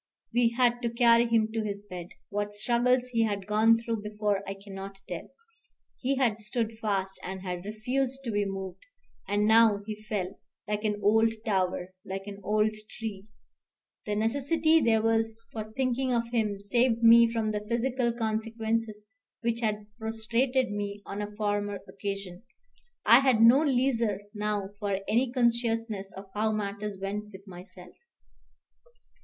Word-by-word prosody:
We 235 -1 +3
had 245 -1 +3
to 235 - 0
carry 235 0 +5
him 225 -1 +2
to 225 - 0
his 200 -1 -5
bed. 180 -3 -7 0.2
What 205 0 -3
struggles 245 +3 +2
he 230 -2 +1
had 205 -3 0
gone 220 +2 +4
through 230 -1 -3
before 210 -1 -1
I 195 - -4
cannot 195 0 -9
tell. - - -6 0.7
He 270 +2 0
had 240 -5 +1
stood 225 0 -3
fast, 195 -3 -1
and 190 0 -6
had 180 -1 -4
refused 250 +5 -2
to 235 - -3
be 205 -1 +1
moved, 195 - -5 0.4
and 205 +1 +1
now 220 -2 +5
he 215 0 -6
fell, 200 -3 -4 0.3
like 210 0 -2
an 210 -1 0
old 220 +2 +4
tower, 185 -3 0
like 195 +1 -5
an 200 -1 -8
old 215 +2 +2 0.3
tree. 210 -3 -6 0.8
The 210 - 0
necessity 285 +8 +2
there 225 -3 +3
was 225 0 +1
for 215 -1 -6
thinking 255 +2 0
of 235 - +2
him 215 -4 0
saved 235 +3 +1
me 230 0 +8
from 225 -2 0
the 210 -1 -3
physical 240 +1 +1
consequences 225 -1 -2 0.4
which 235 -1 0
had 215 -2 -1
prostrated 230 +3 0
me 205 0 -4
on 200 +1 -5
a 205 0 -6
former 205 -1 -1
occasion. 195 -2 -5 0.6
I 235 +3 +8
had 260 -4 +3
no 235 +5 +7
leisure 245 -7 +1
now 210 -2 -2
for 200 -2 0
any 240 +3 +2
consciousness 230 -4 0
of 195 - -8
how 215 +1 +1
matters 205 -1 -3
went 200 +2 -3
with 195 0 -12
myself. 180 -1 -12
215 Hz, 155 wpm, -28 LUFS, 205-235 Hz, 0.8 s, me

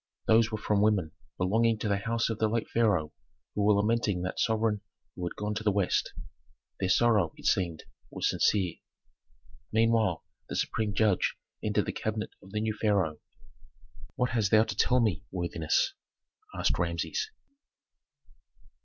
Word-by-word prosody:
Those 110 0 +4
were 110 - -2
from 105 -1 +1
women 100 -7 +2 0.3
belonging 110 +5 +2
to 110 - -3
the 100 -1 +2
house 115 +3 0
of 110 - -4
the 110 - +3
late 115 +1 -1
pharaoh 100 -10 +1 0.4
who 105 - -1
were 105 0 +5
lamenting 105 -3 +1
that 90 - -4
sovereign 110 -2 +1 0.3
who 90 - -6
had - - -6
gone 105 0 -3
to 105 +1 -4
the 105 - +3
west. 100 -2 0 0.7
Their 95 - 0
sorrow, 105 -6 +3
it - - -13
seemed, 85 -4 +1 0.3
was - - -1
sincere. 95 -5 +1 0.9
Meanwhile 110 -5 +2 0.2
the - - -4
supreme 105 -3 -1
judge 105 -3 +2 0.3
entered - - +1
the - - -2
cabinet 110 0 -3
of 95 - -15
the 105 +2 -2
new 110 0 0
pharaoh. 95 -8 +1 1.0
"What 125 0 0
hast 110 -4 +1
thou 110 +1 +6
to 110 -2 -5
tell 125 +5 +3
me, 105 -8 +1
worthiness?" 85 - 0 0.6
asked - - +1
Rameses. 430 0 -1
105 Hz, 155 wpm, -29 LUFS, 95-110 Hz, 1.0 s, thou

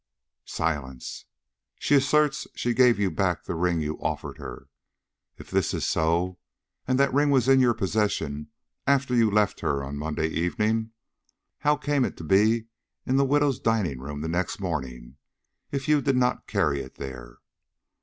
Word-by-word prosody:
Silence. 65 -6 -3 0.5
"She - - 0
asserts 145 +1 +3
she 120 - 0
gave 125 0 +5
you 100 -2 +1
back 90 +1 0
the - - -4
ring 85 -1 0
you 75 0 -3
offered - - -4
her. - - -9 0.7
If - - -13
this - - +1
is - - -2
so, 85 +3 0 0.5
and 130 0 +2
that 140 -2 +3
ring 145 +1 +3
was 130 -3 +3
in 135 0 +6
your 120 -3 +4
possession 100 -8 -1 0.4
after 140 -2 +2
you 115 -3 +4
left 105 -1 +1
her 70 -1 -1
on 70 +1 -5
Monday 80 +1 -2
evening, 105 +7 0 0.7
how 150 0 +3
came 145 0 +1
it - - -3
to - - -8
be 110 +6 +3 0.4
in 130 - +1
the 140 - +4
widow's 145 -1 +2
dining 100 - 0
room 75 +2 -6
the 80 - -3
next 85 +4 -2
morning, 65 -8 -5 0.5
if 140 -1 -3
you 150 -1 +4
did 135 0 +1
not 125 0 +1
carry 70 -1 +1
it 65 - -11
there?" 60 -3 -8
105 Hz, 165 wpm, -26 LUFS, 80-130 Hz, 0.7 s, in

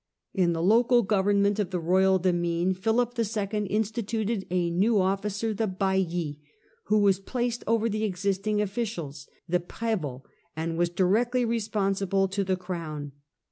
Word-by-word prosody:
In 175 -3 +2
the 165 0 -2
local 235 +5 +4
government 200 0 +2
of 200 -4 0
the 185 -2 -2
royal 190 +3 +3
demesne 175 0 +1
Philip 225 +5 +1
II. 210 -2 -1
instituted 220 0 -1
a 175 -1 0
new 205 +5 +3
officer, 200 +3 0
the 220 +1 -1
hailli, 185 -5 -1 0.5
who 215 - +2
was 200 -2 +4
placed 240 +3 -2
over 230 0 +2
the 215 0 -2
existing 200 +1 0
officials, 185 -10 -4 0.2
the 180 +1 +2
prSvots, 175 - -3 0.3
and 165 +1 -2
was 175 +1 +1
directly 225 +8 +2
responsible 195 -4 0
to 200 +1 -1
the 185 -1 0
crown. 165 -6 -5
195 Hz, 140 wpm, -27 LUFS, 180-215 Hz, 0.5 s, local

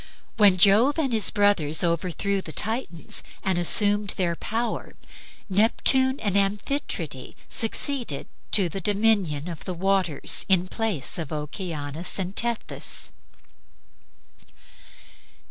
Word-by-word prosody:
When 200 -4 +5
Jove 210 - +4
and 275 -6 -1
his 220 -2 +5
brothers 185 -7 +2
overthrew 180 +3 -1
the 160 - -9
Titans 220 -4 -3 0.2
and 190 -3 0
assumed 205 +3 +4
their 175 -2 0
power, 230 +6 -4 0.5
Neptune 260 +6 +3
and 205 -3 -1
Amphitrite 195 - -3
succeeded 235 - +1 0.2
to 195 -4 +3
the 190 +4 -6
dominion 200 -7 0
of 170 -3 -8
the 185 - -5
waters 190 -3 +1
in 185 -1 +3
place 190 - -2
of 160 -4 -6
Oceanus 155 0 -4
and 190 0 -4
Tethys. 235 -1 -2
195 Hz, 110 wpm, -24 LUFS, 170-220 Hz, 0.5 s, When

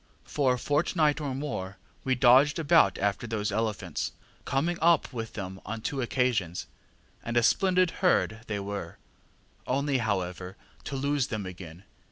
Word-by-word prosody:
For 135 -4 +1
a - - -5
fortnight 150 +2 +1
or 140 -3 -3
more 100 -9 -4 0.3
we 130 -1 +1
dodged 130 +4 +5
about 160 - +4
after 100 +3 -1
those 105 -2 -2
elephants, 100 -6 -2 0.3
coming 165 +6 0
up 165 -4 +3
with 115 -1 -5
them 95 -2 -6
on 110 +2 -5
two 135 +4 -2
occasions, 120 -8 0 0.6
and 115 +1 -2
a 120 - +4
splendid 185 +5 +3
herd 175 - +2
they 105 -2 -2
were 100 0 -5 0.7
only, 140 +1 +1
however, 95 -3 -3 0.3
to 140 - -4
lose 140 0 0
them 110 -4 -4
again. 90 -1 -9
120 Hz, 150 wpm, -28 LUFS, 100-145 Hz, 0.7 s, dodged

